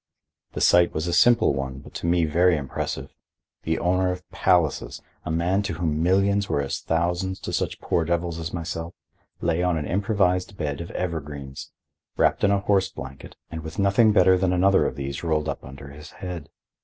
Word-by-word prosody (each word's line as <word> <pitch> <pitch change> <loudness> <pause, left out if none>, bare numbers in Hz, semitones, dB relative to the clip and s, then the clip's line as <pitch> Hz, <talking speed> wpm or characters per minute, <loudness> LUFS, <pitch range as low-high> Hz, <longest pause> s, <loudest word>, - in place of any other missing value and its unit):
The - - -4
sight 85 0 +5
was 80 +1 -1
a 85 - -1
simple 120 +7 +5
one, 65 -1 -4
but 70 - -13
to - - -4
me 85 -1 +3
very 85 +2 +3
impressive. 65 -1 -4 0.5
The 80 0 -1
owner 90 +1 +1
of 90 0 -7
palaces, 90 -6 +1 0.3
a - - -4
man 85 +5 +1
to 100 - -3
whom 80 -2 -1
millions 100 +3 +2
were - - +1
as 70 -1 -2
thousands 90 +3 -1
to - - -5
such - - -2
poor 85 - 0
devils 85 0 -1
as 85 +1 -4
myself, 85 0 -5 0.5
lay 85 0 +1
on 90 -2 +1
an 75 - -3
improvised 95 -1 0
bed 75 -2 -3
of 85 - -7
evergreens, 75 -6 -5 0.5
wrapped - - +2
in 100 - +5
a 100 -1 +2
horse 95 -2 +2
blanket 65 +1 -10 0.2
and 80 -1 -5
with 80 +3 -8
nothing 100 +3 +4
better 95 -2 +5
than 90 -1 +1
another 95 +2 +4
of - - -4
these 70 +1 -5
rolled 80 -2 0
up - - -4
under 70 +1 -10
his 75 +4 -11
head. 90 -6 -7
85 Hz, 190 wpm, -24 LUFS, 80-95 Hz, 0.5 s, sight